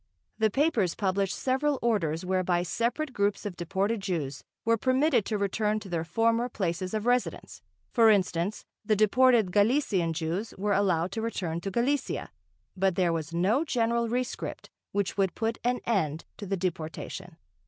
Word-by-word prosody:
The 220 0 +4
papers 230 - +1
published 195 -1 0
several 270 +2 +1
orders 185 -8 0
whereby 180 -1 +1
separate 245 - -1
groups 200 -1 0
of 200 -4 -4
deported 195 +6 -1
Jews 155 -8 -3 0.2
were 230 0 +4
permitted 255 0 +2
to 215 - -1
return 210 +2 0
to 200 -2 -10
their 170 -2 -1
former 230 +7 +1
places 185 -2 -2
of 215 0 -2
residence, 245 0 -1 0.3
for 230 -2 +5
instance, 190 -1 +1 0.2
the 215 0 +2
deported 220 -1 +4
Galician 205 - +2
Jews 170 +7 -3
were 205 +2 0
allowed 185 -3 +1
to 225 - -3
return 175 -7 -3
to 195 - -3
Galicia, 255 +7 -1 0.4
but 190 -1 +1
there 180 -2 +2
was 160 -1 -3
no 195 - +2
general 235 -5 0
rescript 250 +1 -3 0.2
which 200 -1 -1
would 195 -2 +1
put 225 0 -1
an 245 +1 0
end 160 -9 0
to 205 - -7
the 195 +1 -1
deportation.... 175 0 -5
200 Hz, 160 wpm, -28 LUFS, 180-230 Hz, 0.4 s, for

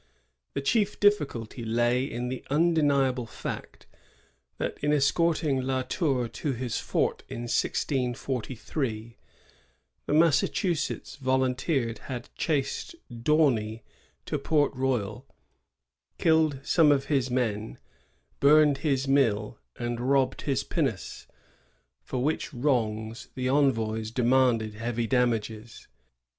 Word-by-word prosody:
The - - -1
chief 210 +6 +1
difficulty 140 - +1
lay 120 +2 +1
in 125 -2 -4
the 130 -1 -5
undeniable 140 -5 +2
fact, - - -7 0.7
that, - - -3
in 145 - +1
escorting 150 -1 +2
La 130 0 -1
Tour 135 -4 0
to 115 +5 -3
his 125 -1 -3
fort - - -1
in 120 - -5
1643, 120 -2 -2 0.9
the - - 0
Massachusetts 165 +1 +1
volunteers 130 -1 0
had 125 -3 -7
chased 150 - -2 0.2
D'Aunay 120 -4 +1 0.4
to - - -2
Port 150 -3 +2
Royal, 125 -2 -2 0.9
killed 160 -4 +3
some 155 0 +4
of 135 -1 +2
his 135 -4 +1
men, 110 -4 -1 0.6
burned 150 -1 +5
his 140 -3 0
mill, 115 -6 +1 0.2
and 120 +1 -3
robbed 135 -1 +2
his 140 -3 -1
pinnace, - - -3 0.7
for 125 -1 -3
which 155 +3 -1
wrongs 115 -4 -1
the 130 -1 -2
envoys 115 -6 +1
demanded 120 -2 +2
heavy 115 +2 -2
damages. 115 -2 -1
130 Hz, 105 wpm, -27 LUFS, 115-145 Hz, 0.9 s, burned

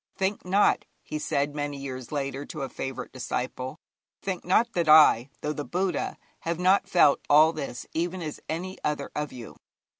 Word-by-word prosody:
'Think 195 +1 -1
not,' 195 +3 +3 0.2
he 155 - -4
said 145 -1 0
many 145 -1 -3
years 130 -3 -7
later 140 -1 -2
to 150 -1 -6
a 135 - -4
favourite 135 -1 -5
disciple 130 +2 -4 0.5
'think 190 -2 -3
not 230 +6 +2
that 170 -3 0
I, 150 -5 +7
though 150 - -1
the 145 - -4
Buddha, 180 +1 -1 0.2
have 170 0 -2
not 190 +2 +3
felt 175 -6 +5
all 155 +2 +7
this 135 -6 -5
even 175 +3 -1
as 155 -2 -5
any 185 +4 -4
other 150 -2 -2
of 150 -1 -2
you. 120 -3 -10
150 Hz, 175 wpm, -27 LUFS, 140-180 Hz, 0.5 s, I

